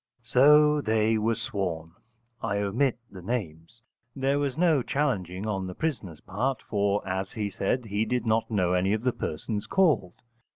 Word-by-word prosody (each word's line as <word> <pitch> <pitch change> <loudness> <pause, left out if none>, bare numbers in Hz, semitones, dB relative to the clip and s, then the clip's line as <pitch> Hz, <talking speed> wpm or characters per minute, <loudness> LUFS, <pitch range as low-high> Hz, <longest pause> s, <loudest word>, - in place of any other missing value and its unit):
So 150 +5 +5
they 110 -2 +2
were 115 +2 +1
sworn. 90 -7 -4 0.5
I 100 - -1
omit 115 +6 +1
the 95 -2 -10
names. 100 0 -5 0.3
There 135 +1 +1
was 140 -1 -2
no 165 -5 +3
challenging 105 - -2
on 95 -3 -2
the 90 - -7
prisoner's 100 - -4
part, 125 +8 -2
for, 100 -1 0
as 95 0 -3
he 105 -4 -3
said, 120 +6 -1
he 105 +1 -1
did 125 -1 -1
not 110 0 +1
know 90 -5 +1
any 95 +2 +2
of 110 +1 -2
the 125 -1 +1
persons 105 +7 -4
called. 155 - +1
110 Hz, 165 wpm, -27 LUFS, 95-130 Hz, 0.5 s, So